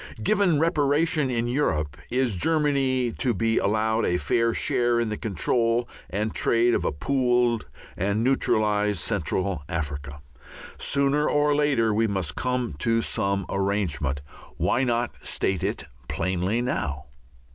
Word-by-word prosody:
Given 200 - +3
reparation 150 -2 +2
in 120 -2 0
Europe, 80 - 0
is 125 -3 +1
Germany 135 - +1
to 125 -4 +1
be 115 +3 +1
allowed 110 +2 +1
a 90 - +1
fair 115 +8 +1
share 120 +1 +1
in 115 -2 0
the 105 - -2
control 115 +4 0 0.2
and 105 +3 -2
trade 120 +1 +2
of - - +1
a - - 0
pooled 120 - +1 0.3
and 100 +4 0
neutralized 105 -5 +1
Central 95 -1 -1
Africa? 70 -4 -4 0.6
Sooner 140 +2 +1
or 145 0 +2
later 135 -7 +2
we 110 +2 +2
must 95 -7 -2
come 125 -4 -1
to 115 +6 +2
some 100 0 0
such - - -4
arrangement. 95 -9 -1 0.3
Why 130 - +1
not 120 -1 0
state 95 -3 -1
it - - -2 0.2
plainly 95 +6 -1
now? 70 - -2
115 Hz, 135 wpm, -25 LUFS, 95-130 Hz, 0.6 s, Given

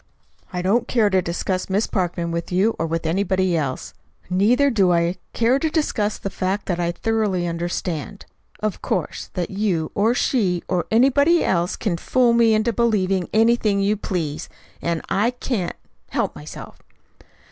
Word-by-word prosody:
"I 180 -1 -3
don't 225 +6 +2
care 220 -4 +2
to 190 -1 +3
discuss 185 +2 -2
Miss 200 +3 +1
Parkman 175 -3 -2
with 170 +1 -4
you 195 +5 +2
or 165 - 0
with 165 +1 -2
anybody 185 +1 +1
else. 140 -5 -3 0.4
Neither 245 +10 +3
do 195 -6 +3
I 170 +1 +1 0.2
care 240 +4 +2
to 320 - 0
discuss 230 -10 0
the 195 - -5
fact 190 +2 -2
that 175 -2 -2
I 170 0 0
thoroughly 210 -2 0
understand, 170 +2 -4 0.4
of 215 -2 -2
course, - - -3
that 180 -2 -2
you, 190 -6 -1
or 220 +4 +2
she, 190 -10 +1
or 180 -2 -1
anybody 280 +8 +4
else, 175 -1 +1
can 195 -7 -2
fool 245 +6 +2
me 230 -2 +4
into 220 +2 +1
believing 195 -6 +1
anything 220 -2 +3
you 200 +2 +2
please; 170 -8 -3 0.3
and 170 -1 -2
I 210 +4 +2
can't 200 -10 -2 0.3
help - - -1
myself." 75 0 -10
195 Hz, 160 wpm, -22 LUFS, 175-225 Hz, 0.4 s, anybody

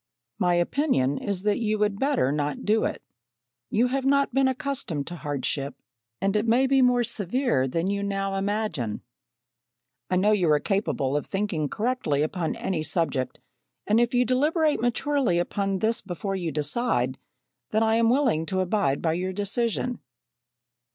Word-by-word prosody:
My 180 -1 +3
opinion 175 - +1
is 195 -2 -3
that 210 -1 +1
you 215 -2 0
would 205 -1 0
better 270 - +2
not 145 0 -2
do 220 +1 +2
it. - - -4 0.7
You 230 +4 +2
have 270 +1 -1
not 280 -1 +2
been 270 0 +3
accustomed 260 - -2
to 175 - -6
hardship, 140 -1 -3 0.4
and 195 +2 0
it 210 +2 +1
may 245 +4 +4
be 270 0 +3
more 250 -1 +4
severe 225 - 0
than 165 +6 -1
you 200 0 -1
now 195 -1 -2
imagine. 195 - -2 1.1
"I 185 - +1
know 200 +4 +3
you 185 -6 +2
are 150 - +4
capable 145 -8 -1
of 145 - -2
thinking 195 -7 -1
correctly 210 - 0
upon 160 +1 -2
any 180 -5 -2
subject 155 -5 -1 0.5
and 215 +2 +3
if 240 +1 +1
you 250 0 +4
deliberate 300 +5 +2
maturely 250 -4 +1
upon 195 +2 -1
this 220 +4 0
before 195 +1 -4
you 175 -4 -2
decide, 150 - 0 0.5
then 220 +1 +2
I 225 0 +3
am 230 0 +3
willing 240 - +2
to 190 +3 -1
abide 180 -7 0
by 160 -1 +2
your 185 +2 -2
decision." 230 +4 -1
200 Hz, 165 wpm, -26 LUFS, 165-240 Hz, 1.1 s, may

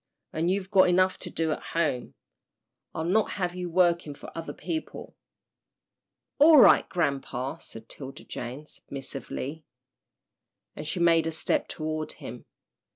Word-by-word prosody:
And 165 +2 0
you've 190 +1 -1
got 190 -2 +6
enough 185 +1 +3
to - - -6
do 160 -1 -1
at - - -2
home. 150 -7 -2 0.8
I'll 160 - -2
not 195 +6 +2
have 180 -3 -2
you 180 -1 -4
working 170 -3 +2
for - - -12
other 165 -1 -5
people." 320 -1 -6 1.2
"All 305 +2 +8
right, 255 - +7
grampa," 140 -3 -2
said 115 0 -11
'Tilda 135 -1 -8
Jane, 125 +5 -6
submissively, 140 +2 -6 1.1
and 150 - -6
she 180 - -2
made 165 -1 +4
a - - -1
step 160 - 0
toward 155 0 -4
him. - - -9
165 Hz, 140 wpm, -27 LUFS, 150-180 Hz, 1.2 s, All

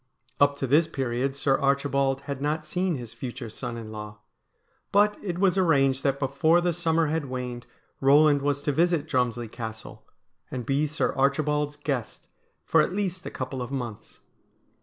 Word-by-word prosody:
Up 145 0 +4
to 140 - -2
this 150 +5 +4
period 135 -2 -2
Sir 140 -1 +1
Archibald 140 -1 +1
had 140 -1 -5
not 155 +2 -1
seen 180 +2 -1
his 120 -4 -7
future 120 0 -6
son 120 +1 -5
in 110 -2 -8
law; 105 -1 -7 0.7
but 205 +1 +4
it 180 -4 -3
was 190 0 +3
arranged 135 -6 +3
that 140 -1 +1
before 140 +5 +3
the 175 0 +1
summer 165 -1 +1
had 155 0 -1
waned 125 -2 -5 0.3
Eoland 145 +1 +5
was 145 0 -1
to 145 - +1
visit 165 0 +1
Drumslie 120 -4 0
Castle, 110 -1 -8 0.5
and 125 -2 -5
be 140 +2 +1
Sir 155 - -1
Archibald's 145 +2 +1
guest 140 -5 -4 0.4
for - - +4
at - - -1
least 190 -3 -2
a - - -3
couple 130 0 -5
of 125 - -4
months. 120 -6 -6
140 Hz, 170 wpm, -26 LUFS, 130-155 Hz, 0.7 s, Eoland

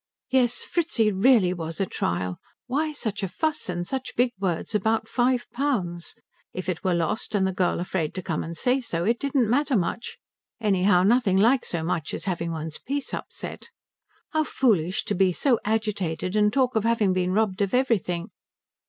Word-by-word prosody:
Yes, 245 -2 +2
Fritzi 310 -11 +1
really 200 -2 +4
was 165 -2 -6
a 195 - +2
trial. 90 - -2 0.3
Why 300 +5 0
such 220 -8 -3
a 195 - -1
fuss 310 - -2
and 175 -1 -2
such 260 +5 -4
big 245 0 +3
words 190 +2 -2
about 220 +2 +1
five 245 0 +1
pounds? 195 -12 -2 0.4
If 185 - -4
it 185 -3 -2
were 185 -2 +2
lost 170 +6 -1
and 195 -2 +3
the 190 - 0
girl 180 -3 +1
afraid 175 -3 -2
to 185 - -4
come 165 -4 -2
and 165 0 -7
say 255 +2 +2
so, 170 -9 -3
it 230 +5 +1
didn't 275 -4 +1
matter 270 +2 +2
much; 190 +5 -3 0.4
anyhow 190 -4 +3
nothing 210 -2 +3
like 240 +6 +4
so 170 -2 -2
much 160 -3 -2
as - - -7
having 170 -3 -2
one's 160 -1 -5
peace 280 +1 -4
upset. - - -6 0.6
How 315 -1 +2
foolish 190 - +1
to - - -2
be 190 0 +3
so 245 - +2
agitated 200 -5 -1
and 210 0 +4
talk 255 0 +1
of 220 - +2
having 225 -4 +2
been 185 0 0
robbed 210 -2 +1
of 200 +3 +1
everything. 210 -8 0
205 Hz, 185 wpm, -25 LUFS, 180-245 Hz, 0.6 s, really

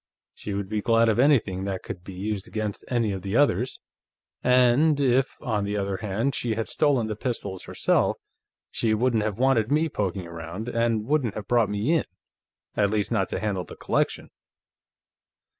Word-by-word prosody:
She 100 - -6
would 100 -1 -3
be 105 +1 -2
glad 115 0 +4
of 110 - +1
anything 110 -9 +3
that 95 -2 -3
could 90 - -7
be 95 0 -9
used 100 +1 -3
against 105 -2 -4
any 115 -4 +1
of 95 -1 -4
the 100 +3 -3
others. 130 -3 +2 0.6
And 125 +4 +4
if, 135 0 +2
on 110 -7 0
the 100 +1 -2
other 100 -1 -1
hand, 110 +6 -1
she 120 -5 -1
had 110 0 -2
stolen 140 -6 +2
the 110 -1 -3
pistols 105 -5 -4
herself, - - +1 0.5
she 110 -1 +1
wouldn't 120 0 +2
have 105 -1 -2
wanted 125 -3 +2
me 155 +2 +2
poking 95 - -2
around, 85 +6 -7
and 115 -2 0
wouldn't 135 -5 0
have 105 -2 -6
brought 120 -4 +3
me 105 +8 0
in, 165 - +2 0.7
at 100 -1 +2
least 105 +1 -1
not 95 -5 +1
to - - -2
handle 100 -3 -1
the - - -11
collection." - - -1
110 Hz, 180 wpm, -25 LUFS, 100-125 Hz, 0.7 s, glad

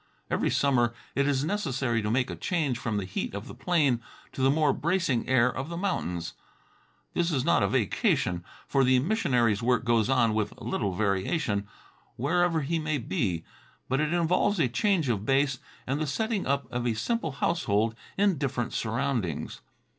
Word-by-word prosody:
Every - - +1
summer 120 -4 +2 0.2
it 140 0 +1
is 140 0 +1
necessary 135 - 0
to 105 - -2
make 125 +3 +1
a - - -4
change 150 -9 -1
from 110 -3 -2
the 100 - -2
heat 95 +1 -4
of 100 - -6
the - - -8
plain 145 -9 +1 0.3
to - - -5
the 135 - +4
more 150 -1 +3
bracing 165 -7 0
air 125 -1 +3
of 135 +4 -4
the 170 - -5
mountains. 90 - -2 0.8
This 175 0 +1
is 135 -5 0
not 170 - +4
a - - +3
vacation, 95 -6 +1 0.2
for 135 -1 +3
the 130 0 +4
missionary's 125 - +2
work 125 -1 +1
goes 115 -1 +2
on 120 -4 +3
with 105 -1 -2
little 100 -3 -2
variation, 100 - 0 0.5
wherever 165 +5 +1
he 165 +4 -1
may 155 -1 -1
be, 95 -7 -1 0.4
but 135 +1 0
it 155 0 +1
involves 175 +3 +2
a 145 - +4
change 165 - +1
of 110 -5 0
base 135 +1 +2 0.3
and 140 +4 -1
the 155 - -1
setting 220 - -1
up 140 0 +1
of 125 0 -1
a 115 - 0
simple 165 - -1
household 115 -9 +1 0.2
in 195 -6 +2
different 125 -4 -2
surroundings. 115 - -2
130 Hz, 175 wpm, -28 LUFS, 115-160 Hz, 0.8 s, the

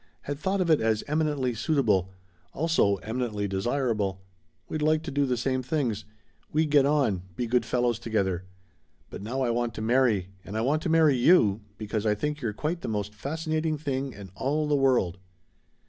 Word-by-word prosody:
Had 145 0 -5
thought 190 +4 0
of 170 -2 +2
it 155 - +4
as 110 -1 +1
'eminently 145 -4 0
suitable' 110 - +1 0.4
also, 160 -10 +2
eminently 110 -3 -2
desirable. 100 -2 -1 0.4
We'd 155 - -3
like 155 +1 +2
to 160 - -5
do 140 0 +1
the 125 -1 0
same 130 +2 0
things. 125 -7 -1 0.5
We'd 155 0 +1
get 140 -2 +5
on 135 -11 +2
be 120 - -2
good 120 0 +1
fellows 120 -2 +1
together. 95 -5 -1 0.7
But - - -7
now 120 +6 -3
I 120 - +1
want 120 -1 -1
to - - -5
marry 115 -6 +2
and 105 +2 -6
I - - +1
want 145 +6 +1
to 170 - -2
marry 160 -3 +5
you 120 - +4 0.2
because 110 0 -2
I 105 - +3
think 150 +7 -3
you're 115 - -1
quite 155 - -3
the - - -5
most 105 -1 -2
fascinating 155 +6 -2
thing 140 -2 -2
in 100 -5 -11
all 150 +8 -1
the 150 - +2
world!" 125 -10 +2
125 Hz, 185 wpm, -27 LUFS, 105-150 Hz, 0.7 s, get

